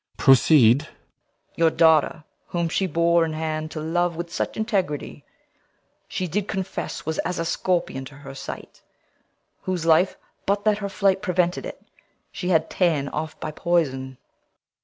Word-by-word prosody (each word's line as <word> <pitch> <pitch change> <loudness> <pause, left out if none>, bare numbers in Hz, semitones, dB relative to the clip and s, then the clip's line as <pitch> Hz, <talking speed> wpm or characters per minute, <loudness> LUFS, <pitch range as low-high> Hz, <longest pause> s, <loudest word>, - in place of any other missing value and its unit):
Proceed. 135 -2 +6
CORNELIUS. - - -14 0.6
Your 165 -1 +5
daughter, 160 0 +3 0.2
whom 170 -1 -1
she 190 +3 0
bore 170 0 +3
in 160 -1 -2
hand 155 0 -3
to 155 - -6
love 170 +2 0
With 170 +1 -6
such - - -2
integrity, 195 -9 -2 0.8
she 185 - -3
did 200 +4 -2
confess 190 -1 -4
Was 160 +1 -2
as 180 +1 -2
a 165 - -1
scorpion 170 -6 -1
to 135 +1 -12
her 135 -1 -10
sight; 135 - -8 0.8
whose 180 -3 -2
life, 165 +3 +4 0.3
But 200 +1 +1
that 215 -1 +3
her 200 -1 -3
flight 195 0 +1
prevented 180 -2 0
it, - - -10 0.5
she 180 - -4
had 160 -3 +3
Ta'en 155 -6 +1
off 155 +1 -5
by 155 - -4
poison. 135 -6 -1
165 Hz, 155 wpm, -24 LUFS, 155-180 Hz, 0.8 s, Proceed